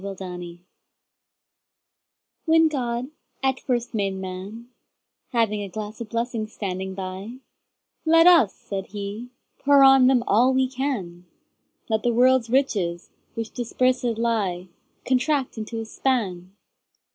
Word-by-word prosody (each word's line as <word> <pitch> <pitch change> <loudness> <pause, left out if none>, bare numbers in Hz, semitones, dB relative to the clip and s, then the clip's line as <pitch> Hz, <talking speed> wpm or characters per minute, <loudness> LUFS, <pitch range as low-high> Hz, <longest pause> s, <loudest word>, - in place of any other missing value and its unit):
The 200 -1 -5
Pulley 180 -2 -8 1.9
WHEN 325 0 +5
God 250 -2 -3 0.3
at 265 -1 +1
first 245 -2 -2
made 200 -3 -1
Man, 190 +5 -7 0.6
Having 225 -4 0
a 200 - -5
glass 215 +3 -7
of 225 - -6
blessings 230 -1 -3
standing 190 -1 -4
by—Let 230 - -2
us 330 - +6
(said 195 -1 -6
He) 205 +4 -6 0.3
pour 280 0 +5
on 270 -1 +7
him 250 -3 +3
all 250 +6 +3
we 260 0 +3
can; 230 -10 -4 0.6
Let 220 -1 0
the 240 +1 +1
world's 250 -1 +4
riches, 200 -10 0 0.2
which 225 -1 -4
dispersèd 245 -1 0
lie, 200 -6 -1 0.4
Contract 265 +1 +1
into 225 +1 -5
a 225 - -4
span. 200 -7 -2
230 Hz, 120 wpm, -24 LUFS, 195-255 Hz, 1.9 s, on